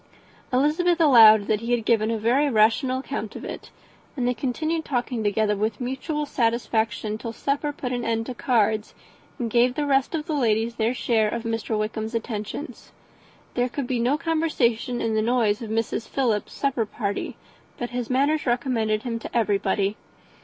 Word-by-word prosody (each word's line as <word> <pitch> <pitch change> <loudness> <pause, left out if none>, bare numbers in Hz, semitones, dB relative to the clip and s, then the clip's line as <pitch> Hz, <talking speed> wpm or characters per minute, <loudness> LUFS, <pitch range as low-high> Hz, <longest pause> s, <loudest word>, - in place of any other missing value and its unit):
Elizabeth 310 +7 +2
allowed 225 -9 +7
that 215 -1 +1
he 230 - -5
had 230 -2 0
given 220 -1 +2
a 230 - 0
very 250 +7 +2
rational 230 +3 +3
account 220 -6 -5
of - - -7
it, - - -7 0.5
and 245 -2 0
they 250 - +2
continued 310 +7 -2
talking 245 -4 -2
together 210 0 +1
with 215 +5 -2
mutual 270 +4 -3
satisfaction 230 -3 -1
till 230 -1 -5
supper 280 +5 -1
put 260 -3 -5
an 245 -1 -2
end 225 0 -1
to 255 - -5
cards, 220 -4 0 0.4
and 235 -3 -3
gave 245 +2 +3
the 300 - -1
rest 275 +2 +1
of 305 -2 -3
the 325 - -3
ladies 230 -3 +1
their 230 +3 +1
share 220 -4 +1
of 235 +1 -4
Mr. 225 -1 -2
Wickham's 220 +2 -3
attentions. 225 +5 -5 0.6
There 245 +1 0
could 280 +1 -3
be 245 -1 -1
no 250 +5 +2
conversation 280 -8 0
in 225 -1 0
the 220 - +2
noise 225 -2 +1
of 225 - -6
Mrs. 225 0 -2
Philips's 235 -6 -1
supper 255 -6 0
party, 205 -1 -4 0.4
but 240 0 -4
his 245 -1 -3
manners 280 +3 +1
recommended 235 -4 0
him 230 -2 -3
to 235 - -4
everybody. 200 -1 +1
235 Hz, 175 wpm, -24 LUFS, 220-265 Hz, 0.6 s, allowed